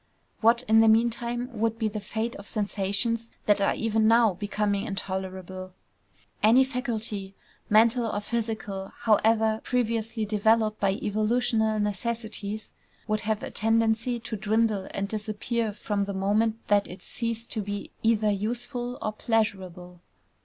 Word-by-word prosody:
What 235 Hz, +2 st, +4 dB
in 220 Hz, 0 st, +6 dB
the 225 Hz, -, +6 dB
meantime 235 Hz, +2 st, +2 dB
would 225 Hz, 0 st, 0 dB
be 225 Hz, -1 st, 0 dB
the 215 Hz, 0 st, -3 dB
fate 220 Hz, +3 st, -3 dB
of 205 Hz, -, -10 dB
sensations 215 Hz, +2 st, -1 dB, 0.2 s
that 205 Hz, -1 st, +3 dB
are 195 Hz, -, +2 dB
even 220 Hz, -1 st, +1 dB
now 225 Hz, -2 st, +5 dB
becoming 205 Hz, +1 st, -1 dB
intolerable? 185 Hz, -1 st, -5 dB, 0.7 s
Any 235 Hz, +5 st, +6 dB
faculty, 225 Hz, -7 st, -4 dB, 0.3 s
mental 230 Hz, +3 st, +4 dB
or 205 Hz, -, -1 dB
physical, 215 Hz, -3 st, -4 dB
however 220 Hz, 0 st, +3 dB
previously 230 Hz, -2 st, -1 dB
developed 215 Hz, +1 st, +2 dB
by 195 Hz, -1 st, +2 dB
evolutional 220 Hz, +1 st, +1 dB
necessities, 215 Hz, 0 st, -3 dB, 0.3 s
would 215 Hz, -1 st, +1 dB
have 215 Hz, 0 st, -2 dB
a -, -, -5 dB
tendency 225 Hz, +2 st, +1 dB
to 230 Hz, 0 st, -5 dB
dwindle 215 Hz, -1 st, +1 dB
and 200 Hz, 0 st, -3 dB
disappear 215 Hz, +2 st, -2 dB
from 205 Hz, -1 st, -2 dB
the 200 Hz, -1 st, -4 dB
moment 215 Hz, +4 st, 0 dB
that 205 Hz, -1 st, +3 dB
it 180 Hz, +1 st, -10 dB
ceased 230 Hz, -1 st, -3 dB
to 220 Hz, -, -1 dB
be 205 Hz, 0 st, -5 dB
either 220 Hz, -2 st, +3 dB
useful 240 Hz, +4 st, -3 dB
or 215 Hz, -, -1 dB
pleasurable. 185 Hz, -6 st, -2 dB
220 Hz, 140 wpm, -27 LUFS, 205-230 Hz, 0.7 s, in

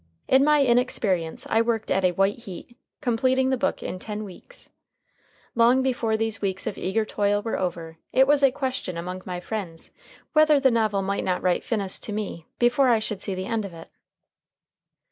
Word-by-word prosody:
In 265 Hz, +1 st, +5 dB
my 295 Hz, -1 st, +4 dB
inexperience 220 Hz, -9 st, 0 dB
I 225 Hz, -, +3 dB
worked 230 Hz, -2 st, -1 dB
at 190 Hz, -, +2 dB
a 180 Hz, -1 st, +3 dB
white 195 Hz, +5 st, +1 dB
heat, 230 Hz, +1 st, -10 dB, 0.3 s
completing 260 Hz, +1 st, +1 dB
the -, -, +3 dB
book -, -, -1 dB
in 185 Hz, -, -5 dB
ten 210 Hz, +2 st, -5 dB
weeks. 210 Hz, -, -11 dB, 0.8 s
Long 240 Hz, +3 st, +4 dB
before 240 Hz, -4 st, 0 dB
these 225 Hz, 0 st, -1 dB
weeks 190 Hz, -2 st, -2 dB
of 215 Hz, -, -3 dB
eager 215 Hz, +4 st, -1 dB
toil 205 Hz, -1 st, 0 dB
were 225 Hz, -, -2 dB
over, 165 Hz, -3 st, -4 dB
it 265 Hz, -, +5 dB
was 290 Hz, +1 st, +3 dB
a 275 Hz, -, +6 dB
question 260 Hz, -9 st, -4 dB
among 180 Hz, +2 st, -5 dB
my 180 Hz, -1 st, -4 dB
friends 180 Hz, -4 st, -6 dB, 0.4 s
whether 305 Hz, -1 st, +5 dB
the 265 Hz, -1 st, +4 dB
novel 215 Hz, -4 st, +1 dB
might 200 Hz, +1 st, -1 dB
not 180 Hz, -1 st, -1 dB
write 180 Hz, -1 st, +1 dB
finis 200 Hz, -5 st, -1 dB
to 210 Hz, -, -4 dB
me 200 Hz, -6 st, -5 dB
before 245 Hz, +2 st, +3 dB
I 235 Hz, -, +5 dB
should 210 Hz, -2 st, -4 dB
see 195 Hz, -, -3 dB
the 185 Hz, 0 st, -4 dB
end 225 Hz, 0 st, -1 dB
of 190 Hz, -4 st, -8 dB
it. 165 Hz, -, -12 dB
215 Hz, 190 wpm, -25 LUFS, 185-250 Hz, 0.8 s, a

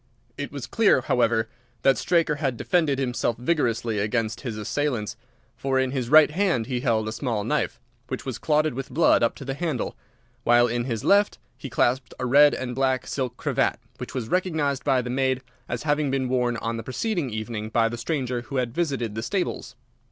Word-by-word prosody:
It 145 Hz, -, -5 dB
was 140 Hz, -3 st, -5 dB
clear, 215 Hz, -, +3 dB
however, 115 Hz, -3 st, +2 dB, 0.4 s
that 135 Hz, -1 st, +5 dB
Straker 165 Hz, -4 st, +1 dB
had 135 Hz, -5 st, -1 dB
defended 160 Hz, -3 st, +1 dB
himself 125 Hz, -3 st, -1 dB
vigorously 120 Hz, -5 st, 0 dB
against 110 Hz, +1 st, -1 dB
his 120 Hz, -5 st, -4 dB
assailants, 115 Hz, 0 st, -2 dB, 0.4 s
for 135 Hz, -1 st, -1 dB
in 130 Hz, -1 st, +1 dB
his 130 Hz, -3 st, -2 dB
right 155 Hz, +1 st, +7 dB
hand 170 Hz, -, +1 dB
he 125 Hz, 0 st, -2 dB
held 110 Hz, -3 st, +1 dB
a -, -, -2 dB
small 115 Hz, -4 st, -2 dB
knife, -, -, -1 dB, 0.3 s
which -, -, -5 dB
was -, -, -4 dB
clotted 155 Hz, -1 st, +2 dB
with 135 Hz, +2 st, -5 dB
blood 165 Hz, -, +4 dB
up 115 Hz, -, +2 dB
to 140 Hz, -, -9 dB
the 135 Hz, -, -2 dB
handle, 145 Hz, -4 st, -2 dB, 0.5 s
while 120 Hz, +1 st, +5 dB
in 120 Hz, 0 st, -1 dB
his 115 Hz, -4 st, -3 dB
left 205 Hz, +1 st, +4 dB, 0.2 s
he 135 Hz, -, -8 dB
clasped 125 Hz, +1 st, 0 dB
a 125 Hz, -, -3 dB
red 145 Hz, +4 st, +6 dB
and 125 Hz, -1 st, -4 dB
black 130 Hz, 0 st, +1 dB
silk 125 Hz, -3 st, -3 dB
cravat, -, -, 0 dB, 0.2 s
which -, -, -7 dB
was 120 Hz, -4 st, -2 dB
recognised 155 Hz, -5 st, 0 dB
by 130 Hz, -3 st, +2 dB
the 125 Hz, -, -4 dB
maid 130 Hz, 0 st, 0 dB, 0.3 s
as 120 Hz, 0 st, -3 dB
having 150 Hz, -1 st, +1 dB
been 135 Hz, -1 st, 0 dB
worn 125 Hz, -2 st, +1 dB
on 115 Hz, 0 st, -3 dB
the 115 Hz, -, -5 dB
preceding 155 Hz, -, -2 dB
evening 110 Hz, -1 st, -4 dB
by 115 Hz, 0 st, +3 dB
the 115 Hz, -, -4 dB
stranger 125 Hz, -1 st, -2 dB
who 135 Hz, +3 st, -8 dB
had 125 Hz, -3 st, -1 dB
visited 135 Hz, -10 st, -1 dB
the 110 Hz, -, -3 dB
stables. 185 Hz, -, -3 dB
130 Hz, 195 wpm, -25 LUFS, 120-145 Hz, 0.5 s, right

